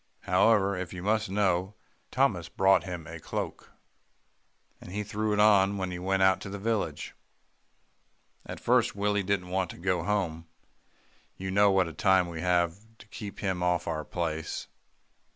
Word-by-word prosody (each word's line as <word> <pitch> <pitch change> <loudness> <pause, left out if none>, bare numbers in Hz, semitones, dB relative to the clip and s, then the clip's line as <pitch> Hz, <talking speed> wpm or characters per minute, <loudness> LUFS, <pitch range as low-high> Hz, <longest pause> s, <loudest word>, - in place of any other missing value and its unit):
However, 100 +1 +3
if 90 0 -5
you 90 -1 -7
must 110 +1 +1
know, 95 0 0 0.3
Thomas 105 -11 +1
brought 95 +2 +3
him 90 -4 -6
a - - -8
cloak, - - -5 1.1
and - - -10
he 105 +2 -3
threw 105 +1 -2
it 105 - +1
on 100 -2 +5
when 95 -1 -2
we 90 -1 -5
went 95 +1 +2
to - - -6
the 100 - -5
village. 110 +1 -2 1.3
"At - - -8
first, - - +2
Willie 105 0 +1
didn't 95 -2 -1
want 95 -1 -1
to - - -9
go 90 -1 0
home. 85 -5 -2 0.9
You 95 0 -4
know 100 +1 +5
what 95 -2 +3
a 80 - -7
time 95 -1 +3
we 80 -2 -6
have 90 0 +1 0.2
to - - -15
keep 105 -4 -8
him 95 -3 -1
off 90 -1 +1
our 80 -2 -2
place. 80 -1 -4
95 Hz, 165 wpm, -28 LUFS, 90-100 Hz, 1.3 s, on